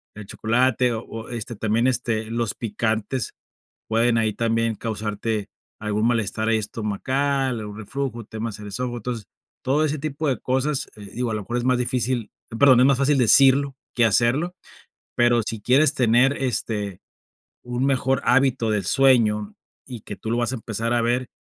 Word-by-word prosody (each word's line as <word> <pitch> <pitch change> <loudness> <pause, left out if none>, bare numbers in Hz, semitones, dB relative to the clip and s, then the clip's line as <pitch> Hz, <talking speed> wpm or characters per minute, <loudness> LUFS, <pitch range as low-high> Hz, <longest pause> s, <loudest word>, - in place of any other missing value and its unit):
el 105 0 -9
chocolate, 125 +3 +1
o 110 - -3
o, 115 +1 -8
este, 120 -1 -5
también, 110 +4 +1
este, 115 -3 0
los 115 -2 -1
picantes 110 +2 -2 0.6
pueden 115 +1 +2
ahí 110 -1 +1
también 115 0 0
causarte 105 -1 -3 0.3
algún 105 +1 -1
malestar 110 -2 0
ahí 110 -1 +3
estomacal, 130 +5 -1
algún 105 0 -7
reflujo, 120 +1 -4
temas 110 -1 -6
en 105 - -9
el 105 - -7
esófago. 120 +3 -3
Entonces, 115 -2 -5 0.4
todo 145 +4 +1
ese 155 0 -1
tipo 150 +1 -3
de 130 - 0
cosas, 130 +2 -1
eh, 105 -1 -10
digo 120 -1 -2
a - - -1
lo 105 - -2
mejor 120 +5 -4
es 120 - -1
más 125 -1 +2
difícil, 125 -2 -1 0.3
perdón, 130 -3 +6
es 130 - +6
más 135 -2 +3
fácil 140 +1 +3
decirlo 135 +3 +5 0.2
que 120 - +3
hacerlo, 120 - +2 0.6
pero 120 -1 +3
si 110 -1 -5
quieres 140 +5 +4
tener, 125 +3 +3
este, 105 -6 -2 0.6
un 125 +2 -2
mejor 135 -1 +1
hábito 125 -3 +2
del 100 -4 -1
sueño 110 -5 +3 0.3
y 125 -4 -8
que 105 - -7
tú 110 - -5
lo 120 - +1
vas 120 +1 0
a 130 - -2
empezar 115 +1 -3
a 120 - +2
ver, 120 +2 0
120 Hz, 175 wpm, -23 LUFS, 110-130 Hz, 0.6 s, perdón